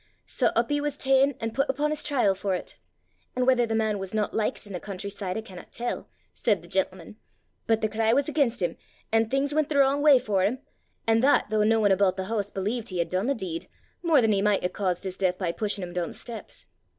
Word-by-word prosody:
Sae -, -, 0 dB
up -, -, +1 dB
he 290 Hz, 0 st, +1 dB
was 290 Hz, -1 st, -2 dB
ta'en 270 Hz, 0 st, +3 dB
an' 225 Hz, 0 st, -3 dB
put 275 Hz, +5 st, 0 dB
upo' 295 Hz, +3 st, 0 dB
's 305 Hz, -, -4 dB
trial 255 Hz, -9 st, +2 dB
for 190 Hz, -1 st, -1 dB
't. -, -, -12 dB, 0.6 s
An' 250 Hz, 0 st, +1 dB
whether 250 Hz, -2 st, +3 dB
the 225 Hz, -, -1 dB
man 220 Hz, -2 st, 0 dB
was 195 Hz, +2 st, -6 dB
not 210 Hz, -1 st, 0 dB
likit 220 Hz, 0 st, -1 dB
i' 200 Hz, -, -9 dB
the 180 Hz, -, -3 dB
country 200 Hz, 0 st, -6 dB
side, 195 Hz, -2 st, -4 dB
I -, -, -2 dB
cannot 185 Hz, -5 st, -12 dB
tell,' 240 Hz, +1 st, -4 dB, 0.2 s
said 205 Hz, -7 st, 0 dB
the -, -, -13 dB
gentleman, 190 Hz, +3 st, -2 dB, 0.5 s
'but 225 Hz, -1 st, +2 dB
the 215 Hz, -, +2 dB
cry 220 Hz, +1 st, +1 dB
was 275 Hz, +3 st, +2 dB
again' 295 Hz, -4 st, +2 dB
him, 180 Hz, -8 st, -3 dB, 0.3 s
and 225 Hz, 0 st, +2 dB
things 275 Hz, +3 st, 0 dB
went 310 Hz, -1 st, +1 dB
the 295 Hz, -, 0 dB
wrong 275 Hz, +1 st, +4 dB
way 290 Hz, -2 st, +7 dB
for 210 Hz, -6 st, 0 dB
him 215 Hz, +7 st, +1 dB, 0.5 s
and 225 Hz, 0 st, +3 dB
that 265 Hz, -5 st, +3 dB
though 215 Hz, -1 st, +3 dB
no 225 Hz, +1 st, +3 dB
one 205 Hz, -2 st, +3 dB
aboot 190 Hz, -1 st, +3 dB
the 190 Hz, -, -3 dB
hoose 205 Hz, -1 st, -2 dB
believed 215 Hz, +5 st, -3 dB
he 185 Hz, -, -4 dB
had 170 Hz, -, 0 dB
done 185 Hz, +5 st, -1 dB
the 280 Hz, -, +1 dB
deed, 175 Hz, -6 st, -5 dB, 0.3 s
more 325 Hz, -6 st, +4 dB
than 225 Hz, -2 st, +3 dB
he 200 Hz, -1 st, +2 dB
micht 210 Hz, -1 st, +2 dB
hae 180 Hz, -, +1 dB
caused 185 Hz, -2 st, -2 dB
his 185 Hz, -1 st, -5 dB
deith 185 Hz, -2 st, +1 dB
by 180 Hz, -3 st, -1 dB
pushin' 205 Hz, +1 st, -2 dB
him 175 Hz, -1 st, -6 dB
doon 175 Hz, -1 st, -1 dB
the -, -, -8 dB
steps. 230 Hz, -3 st, -8 dB
220 Hz, 250 wpm, -26 LUFS, 195-260 Hz, 0.6 s, way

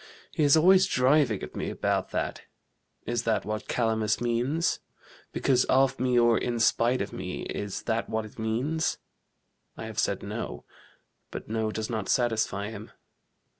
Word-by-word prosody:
"He 160 Hz, -, -2 dB
is 145 Hz, +1 st, +6 dB
always 185 Hz, +4 st, +6 dB
driving 130 Hz, -4 st, +3 dB
at -, -, -8 dB
me -, -, -3 dB
about -, -, -1 dB
that: -, -, -3 dB, 0.6 s
is 120 Hz, +1 st, -1 dB
that 115 Hz, -2 st, 0 dB
what 105 Hz, +1 st, -4 dB
Calamus 110 Hz, -3 st, +1 dB
means? 120 Hz, +7 st, 0 dB, 0.5 s
because 130 Hz, -2 st, +2 dB
of 135 Hz, 0 st, +3 dB
me 125 Hz, -1 st, +2 dB
or 120 Hz, -1 st, +4 dB
in 120 Hz, -1 st, -2 dB
spite 115 Hz, +1 st, +3 dB
of 100 Hz, -, -8 dB
me, 90 Hz, 0 st, -5 dB
is 100 Hz, -1 st, -4 dB
that 115 Hz, 0 st, -1 dB
what 110 Hz, 0 st, -1 dB
it 110 Hz, -, -13 dB
means? 125 Hz, +9 st, -1 dB, 0.8 s
I -, -, -6 dB
have -, -, -5 dB
said -, -, 0 dB
no, -, -, -5 dB, 0.6 s
but -, -, -8 dB
no 110 Hz, 0 st, -1 dB
does 110 Hz, 0 st, -3 dB
not 110 Hz, -4 st, -3 dB
satisfy 110 Hz, -4 st, 0 dB
him. 110 Hz, -1 st, -9 dB
115 Hz, 160 wpm, -27 LUFS, 110-130 Hz, 0.8 s, is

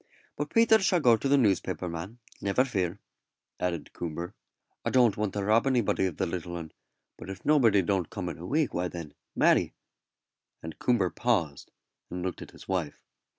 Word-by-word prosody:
But 145 Hz, 0 st, -3 dB
Peters 225 Hz, -2 st, +5 dB
shall 185 Hz, -2 st, +3 dB
go 120 Hz, -6 st, +5 dB
to 125 Hz, -, -2 dB
the 140 Hz, +1 st, +4 dB
newspaper 95 Hz, -6 st, +1 dB
man, 85 Hz, +7 st, -6 dB, 0.2 s
never 100 Hz, +6 st, +2 dB
fear," 95 Hz, -7 st, -1 dB, 0.6 s
added 85 Hz, -4 st, -3 dB
Coomber; 85 Hz, +3 st, -5 dB, 0.5 s
"I -, -, 0 dB
don't 120 Hz, -6 st, +4 dB
want 105 Hz, -2 st, -2 dB
to 100 Hz, -, -2 dB
rob 110 Hz, +6 st, +3 dB
anybody 120 Hz, -7 st, +2 dB
of 90 Hz, -, -6 dB
the -, -, 0 dB
little 85 Hz, 0 st, -4 dB
'un; 80 Hz, -2 st, -6 dB, 0.5 s
but -, -, -10 dB
if 95 Hz, -, -8 dB
nobody 115 Hz, -10 st, +4 dB
don't 95 Hz, -2 st, 0 dB
come 95 Hz, -4 st, -5 dB
in 85 Hz, -3 st, -5 dB
a 85 Hz, -, -7 dB
week, 150 Hz, +2 st, +1 dB
why 90 Hz, +1 st, -1 dB
then, 85 Hz, -4 st, -8 dB, 0.2 s
Mary -, -, +3 dB, 0.4 s
" -, -, -51 dB
and 80 Hz, 0 st, -8 dB
Coomber 110 Hz, -8 st, +2 dB
paused, 90 Hz, -, -1 dB, 0.4 s
and 90 Hz, 0 st, -5 dB
looked 90 Hz, -2 st, -4 dB
at -, -, -8 dB
his -, -, -15 dB
wife. 90 Hz, -6 st, -3 dB
95 Hz, 190 wpm, -28 LUFS, 85-120 Hz, 0.6 s, Peters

